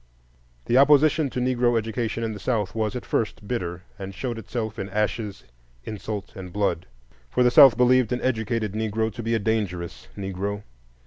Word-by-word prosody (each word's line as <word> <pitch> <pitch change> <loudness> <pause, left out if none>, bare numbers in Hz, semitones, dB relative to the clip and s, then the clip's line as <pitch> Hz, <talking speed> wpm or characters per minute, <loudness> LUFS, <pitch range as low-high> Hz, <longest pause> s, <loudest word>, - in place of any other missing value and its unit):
The 125 - +4
opposition 150 +1 +5
to 125 - -4
Negro 125 -1 +2
education 115 +1 -2
in 110 -1 -2
the 105 - -8
South 105 -6 -1
was 110 +1 -1
at 125 - -5
first 105 -2 -2
bitter, 90 -7 -3 0.2
and 95 0 -7
showed 120 -1 -4
itself 110 -1 -4
in 95 - -4
ashes, 105 0 -2 0.4
insult, 105 - -6
and 90 -2 -8
blood; 100 -3 -1 0.4
for 125 - +2
the 125 - +4
South 135 -3 +8
believed 125 -1 +4
an 125 - 0
educated 115 -4 -1
Negro 110 0 -1
to 120 - -6
be 115 0 0
a - - +3
dangerous 100 -6 -2
Negro. 100 +1 -4
110 Hz, 175 wpm, -25 LUFS, 100-125 Hz, 0.4 s, South